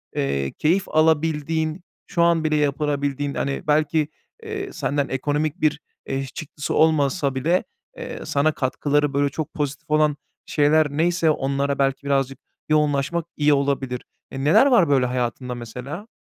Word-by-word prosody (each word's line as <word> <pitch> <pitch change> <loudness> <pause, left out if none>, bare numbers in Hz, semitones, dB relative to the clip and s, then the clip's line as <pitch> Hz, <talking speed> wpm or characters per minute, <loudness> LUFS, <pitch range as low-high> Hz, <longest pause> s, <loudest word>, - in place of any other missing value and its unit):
eee, 70 0 -1
keyif 185 +6 0
alabildiğin, 160 +1 +1 0.2
şu 170 - 0
an 170 -2 +3
bile 155 -1 +1
yapılabildiğin, 145 -1 0
hani, 140 0 -2
belki, 150 0 +2 0.4
eee, 410 -3 -5
senden 140 0 -1
ekonomik 145 +5 -1
bir, 150 -1 +2 0.3
eee, 135 0 -2
çıktısı 145 +2 -6
olmasa 145 -2 +2
bile, 165 +8 +1 0.3
eee, - - -6
sana 145 +2 +2
katkıları, 145 +1 0
böyle, 140 0 +2
çok 150 +1 -5
pozitif 145 0 -4
olan 150 -1 +3 0.3
şeyler 150 +1 +3
neyse 165 +2 +2
onlara 140 0 -1
belki 135 0 +1
birazcık 135 -1 0 0.3
yoğunlaşmak 150 +2 +1
iyi 150 0 +4
olabilir. 140 -3 -1 0.3
E, 135 0 -5
neler 160 - +6
var 235 - +4
böyle 135 -3 +3
hayatında 125 0 -2
mesela? 125 - -7
145 Hz, 140 wpm, -23 LUFS, 135-155 Hz, 0.4 s, neler